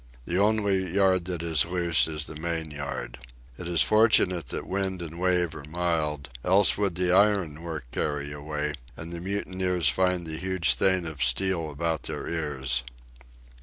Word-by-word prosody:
The 85 +2 -1
only 100 -3 +1
yard 95 -3 +3
that 90 -2 -3
is 80 -4 +3
loose 85 -1 +2
is 75 -2 -4
the - - -7
main 80 0 -3
yard. 70 -3 -6 0.4
It 90 - -6
is 85 -1 +3
fortunate 105 -6 +3
that - - -5
wind 95 -1 -2
and 85 0 -7
wave 90 -2 +1
are 75 - -9
mild, 75 -3 -2
else 95 +2 +5
would 100 -4 -1
the 90 0 +1
iron 95 -6 +3
work 80 -4 -5
carry 70 -1 -2
away 75 0 -4 0.2
and 80 +3 -7
the 85 - -4
mutineers 95 -3 +1
find 90 +2 +1
the 80 -1 -5
huge 95 -2 +2
thing 95 -2 +2
of 80 -4 -6
steel 80 +6 +1
about 80 +2 -2
their - - -5
ears. 70 -6 -1
85 Hz, 165 wpm, -26 LUFS, 75-95 Hz, 0.4 s, else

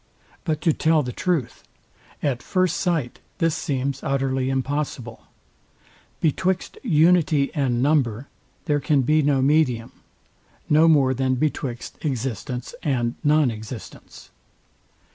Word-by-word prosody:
But 155 -3 -1
to 160 0 +3
tell 155 0 +2
the 125 - -4
truth, 170 -3 -2 0.6
at 135 -4 0
first 185 -2 0
sight 165 -10 -1 0.2
this 165 -3 +1
seems 140 -4 -2
utterly 135 -1 0
impossible. 135 -3 -3 0.9
Betwixt 185 +4 0
unity 160 - +3
and 130 -6 0
number 135 -4 +1 0.4
there 150 -3 +1
can 140 -1 +2
be 155 +4 +3
no 140 -2 +2
medium; 135 -6 +2 0.8
no 155 +2 +5
more 140 -5 +4
than 130 0 0
betwixt 130 -3 -3
existence 125 - -3
and 120 -6 0
nonexistence. 125 -6 -2
140 Hz, 110 wpm, -23 LUFS, 130-155 Hz, 0.9 s, no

